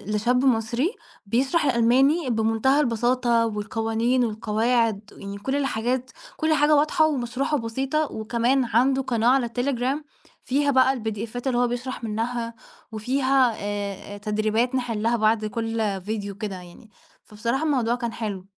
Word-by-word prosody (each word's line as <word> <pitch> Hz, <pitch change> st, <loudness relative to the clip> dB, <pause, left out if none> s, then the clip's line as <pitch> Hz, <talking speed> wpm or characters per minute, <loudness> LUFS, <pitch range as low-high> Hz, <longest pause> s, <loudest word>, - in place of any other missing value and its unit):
لشاب 245 Hz, +5 st, +2 dB
مصري 235 Hz, -, +1 dB, 0.3 s
بيشرح 265 Hz, -, +1 dB
الألماني 265 Hz, +5 st, +3 dB
بمنتهى 225 Hz, +4 st, +2 dB
البساطة 240 Hz, -2 st, +2 dB
والقوانين 225 Hz, +3 st, 0 dB
والقواعد، 220 Hz, 0 st, 0 dB, 0.2 s
يعني 200 Hz, 0 st, -7 dB
كل 265 Hz, +7 st, -2 dB
الحاجات 255 Hz, -2 st, -1 dB, 0.3 s
كل 315 Hz, 0 st, +2 dB
حاجة 300 Hz, 0 st, +4 dB
واضحة 305 Hz, +1 st, +3 dB
ومشروحة 270 Hz, +1 st, -1 dB
بسيطة، 270 Hz, +5 st, -2 dB
وكمان 235 Hz, +4 st, 0 dB
عنده 255 Hz, +4 st, +2 dB
قناة 235 Hz, -3 st, 0 dB
على 260 Hz, 0 st, +4 dB
التليجرام 255 Hz, +4 st, -1 dB, 0.4 s
فيها 285 Hz, +2 st, +1 dB
بقى 265 Hz, 0 st, +4 dB
الpdfات 225 Hz, +2 st, -4 dB
اللي 250 Hz, -2 st, +1 dB
هو 245 Hz, 0 st, +3 dB
بيشرح 245 Hz, +1 st, -5 dB
منها 230 Hz, +2 st, -3 dB, 0.4 s
وفيها 255 Hz, +2 st, +2 dB
آآ 205 Hz, 0 st, -5 dB
تدريبات 215 Hz, +4 st, 0 dB
نحلها 235 Hz, -2 st, 0 dB
بعد 215 Hz, 0 st, +2 dB
كل 220 Hz, -3 st, -2 dB
فيديو 200 Hz, 0 st, -4 dB
كده 205 Hz, -1 st, -5 dB
يعني، 180 Hz, +5 st, -13 dB, 0.3 s
فبصراحة 230 Hz, +7 st, -2 dB
الموضوع 250 Hz, -6 st, +1 dB
كان 235 Hz, -2 st, -4 dB
حلو. 200 Hz, -5 st, -5 dB
235 Hz, 130 wpm, -24 LUFS, 220-260 Hz, 0.4 s, حاجة